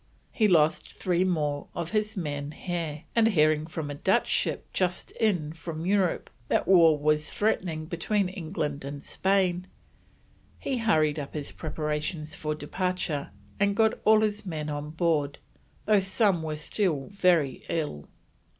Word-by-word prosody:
He 215 - +3
lost 160 -4 +3
three 180 -1 +1
more 150 -6 -1
of 170 -1 -4
his 215 -1 -1
men 145 -3 -3
here, 165 -4 -4
and 230 -1 +5
hearing 155 -6 +3
from 160 -3 -4
a - - -3
Dutch 145 - +2
ship - - 0
just 180 -1 -1
in 175 -9 0
from 165 0 -6
Europe 190 -2 +1 0.2
that - - +1
war 165 -5 +6
was 150 +1 +1
threatening 175 -7 -1
between 190 +4 0
England 160 -6 -4
and 140 +1 -6
Spain, 185 -2 +1 0.9
he 265 -3 -2
hurried 155 -9 +2
up 140 +1 -7
his 145 -2 -4
preparations 150 0 -3
for 155 0 -3
departure 160 - -2 0.3
and 200 0 +2
got 220 0 +4
all 215 0 +6
his 210 0 0
men 155 -5 -4
on 145 0 -4
board, 155 -3 0 0.5
though 210 -1 +5
some 195 -2 +2
were 155 -1 -3
still 155 -3 -1
very 175 -9 +2
ill. 150 - -3
165 Hz, 150 wpm, -27 LUFS, 150-190 Hz, 0.9 s, war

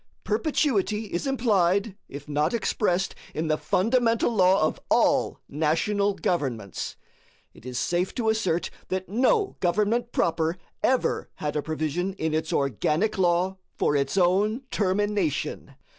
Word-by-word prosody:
Perpetuity 215 - 0
is 175 +10 -1
implied, 200 -6 +2
if 140 +1 -9
not 150 +9 0
expressed, 190 -4 0 0.2
in 160 +1 -1
the 155 - +2
fundamental 230 +3 +2
law 190 -3 +4
of - - -2
all - - +2
national 195 +7 +1
governments. 125 - -2 0.6
It 120 - -13
is 125 -1 -4
safe 175 +8 0
to 225 -3 0
assert 190 -6 0 0.2
that 185 0 -3
no 390 - +2
government 210 +6 +1
proper 165 +1 0 0.2
ever 260 -1 +1
had 150 0 -3
a 150 - +1
provision 155 +5 -2
in 160 -4 -2
its 160 0 -1
organic 150 - 0
law 180 +1 +2 0.2
for 145 - +2
its 140 +5 0
own 200 +7 +2
termination. 185 -9 -1
185 Hz, 130 wpm, -26 LUFS, 155-215 Hz, 0.6 s, law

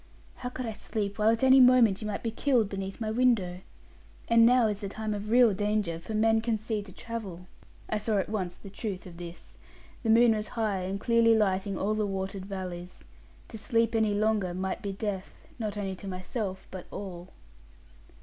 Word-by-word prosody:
'How 250 - -4
could 250 0 -5
I 225 - -3
sleep, 210 -1 -4
while 215 +1 +4
at 230 +2 +1
any 265 0 +7
moment 245 -6 +6
you 215 - -4
might 210 - -4
be 230 - -1
killed 235 -3 +2
beneath 195 -1 -5
my 220 -1 -2
window? 220 -7 +2 0.7
And 230 0 +6
now 250 -1 +5
is 210 -1 -1
the 200 - -4
time 215 +1 -3
of 205 +1 -5
real 240 -2 +6
danger; 205 -4 -1
for 215 +6 -6
men 225 +1 +3
can 225 -1 0
see 215 0 -3
to 200 -2 -12
travel.' 195 -5 -7 0.4
I 215 - -1
saw 210 0 0
at 195 - 0
once 190 -4 -3
the 195 - -12
truth 200 -2 -5
of 175 -2 -11
this. 170 0 -10 0.4
The 230 - -2
moon 230 +1 +6
was 215 0 -3
high 215 -4 0
and 190 +2 -3
clearly 230 0 +4
lighting 195 -1 0
all 210 +2 0
the 215 -1 0
watered 195 0 -4
valleys. 180 -2 -6 0.5
To 220 - -7
sleep 230 +2 +1
any 220 -2 +2
longer 210 -4 +1
might 190 +1 -3
be 200 - -3
death, 195 -1 -5
not 215 -2 -3
only 195 -2 -2
to 200 - -9
myself, 190 +1 -4
but 185 -2 -8
all. 180 -3 -7
210 Hz, 200 wpm, -29 LUFS, 190-225 Hz, 0.7 s, any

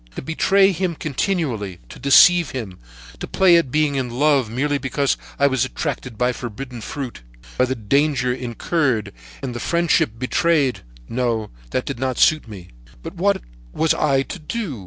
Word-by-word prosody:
"To - - -5
betray 195 +6 +3
him 180 -1 -2
continually, 135 - -2
to - - -11
deceive 165 +3 +6
him, 110 -8 -6 0.4
to - - -5
play 185 -3 +4
at 165 -6 +1
being 150 +1 +1
in 130 -3 -2
love 135 -1 +2
merely 140 +5 -1
because 140 +1 0 0.2
I 140 - +3
was 130 -3 +2
attracted 130 -3 -4
by 125 +2 +1
forbidden 120 +1 -7
fruit, 125 - -6 0.3
by 125 - +3
the 130 +1 -2
danger 130 +3 +1
incurred 125 - -1 0.3
and 130 -2 -3
the 120 - -5
friendship 170 -10 +1
betrayed! 140 +2 +1 0.3
No, 115 -3 -1 0.2
that 130 - -2
did 140 -4 -5
not 130 -1 -1
suit 155 -5 +3
me, 95 -5 -10 0.3
but - - -7
what - - 0 0.3
was 160 0 +2
I 135 -3 +1
to 185 - -8
do? 165 - -4
135 Hz, 165 wpm, -21 LUFS, 120-155 Hz, 0.4 s, deceive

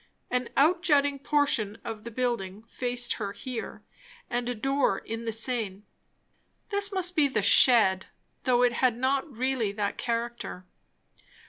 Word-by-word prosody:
An 250 -1 -1
out 335 +5 +4
jutting 285 -5 +2
portion 275 -8 +1
of 225 -2 -7
the - - -5
building 220 -5 -3
faced 245 +1 -1
her 200 -1 -3
here, 245 +2 -7 0.5
and 240 0 -1
a 245 - -2
door 270 -3 +1
in 225 +1 -6
the 225 - -1
sane. 220 -3 -2 0.8
This 405 -1 0
must 365 -2 0
be 300 -2 +4
the 215 -7 -1
"shed," 195 -7 +5 0.4
though 250 -1 +3
it 245 -1 +3
had 245 -1 +1
not 270 +4 0
really 255 -4 0
that 205 -1 -3
character. 235 -5 -4
245 Hz, 145 wpm, -27 LUFS, 225-270 Hz, 0.8 s, shed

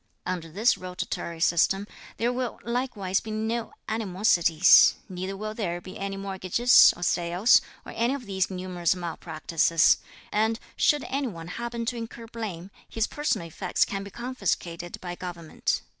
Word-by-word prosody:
Under 180 -3 -3
this 210 +9 +2
rotatory 180 -2 -5
system, 180 +4 +2 0.3
there 240 +2 +1
will 250 -1 -3
likewise 235 -6 -1
be 220 - -9
no 220 +2 -2 0.2
animosities; 185 -5 +5
neither 185 +1 -5
will 215 +1 -4
there 175 -6 -3
be 185 +1 -10
any 195 0 -3
mortgages, 195 +5 +5
or 175 - -6
sales, 175 +5 +4 0.2
or - - -8
any 240 +4 +1
of 265 -4 -8
these 190 -2 0
numerous 180 -2 -1
malpractices; 165 -1 +2 0.3
and 220 +2 +1 0.2
should 295 -1 +3
any 275 0 -2
one 170 -6 -8
happen 235 +3 -4
to 240 +1 -2
incur 230 0 -7
blame, 205 -6 -6 0.2
his 225 -1 0
personal 295 - -2
effects 180 +3 0
can 195 0 -4
be 200 - -8
confiscated 195 -8 -3
by 175 -1 -5
Government. 175 -3 -3
195 Hz, 150 wpm, -26 LUFS, 175-230 Hz, 0.3 s, animosities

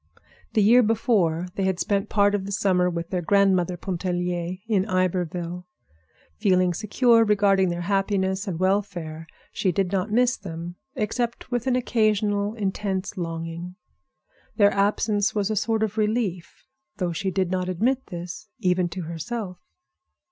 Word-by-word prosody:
The 215 - +3
year 240 +5 +7
before 210 -7 +1
they 195 - -2
had 190 -2 0
spent 195 +3 0
part 205 -1 +3
of 195 -1 -1
the - - -5
summer 180 -2 +2
with 170 0 -5
their 180 -2 0
grandmother 185 -1 +2
Pontellier 180 -1 -2
in 205 -5 +2
Iberville. 180 -1 -1 0.7
Feeling 185 - +3
secure 230 +4 +3
regarding 200 -3 +3
their 175 0 -3
happiness 195 +1 0
and 180 -4 -2
welfare, 180 -5 -1 0.2
she 185 - 0
did 185 +1 0
not 195 +1 0
miss 245 +2 +3
them 170 -1 -7 0.2
except 235 +1 -2
with 245 0 -1
an 255 - +3
occasional 215 -3 +1
intense 195 -2 -2
longing. 165 0 -5 0.8
Their 205 -2 +5
absence 205 +1 +1
was 205 0 0
a - - 0
sort 220 +1 +1
of 220 0 -2
relief, 210 -5 -1 0.3
though 180 -3 -1
she 190 +3 -2
did 185 0 -1
not 185 -1 -1
admit 245 +9 0
this, 175 +4 -7
even 180 -1 +1
to 180 +1 -5
herself. 180 +4 -5
190 Hz, 150 wpm, -24 LUFS, 180-210 Hz, 0.8 s, year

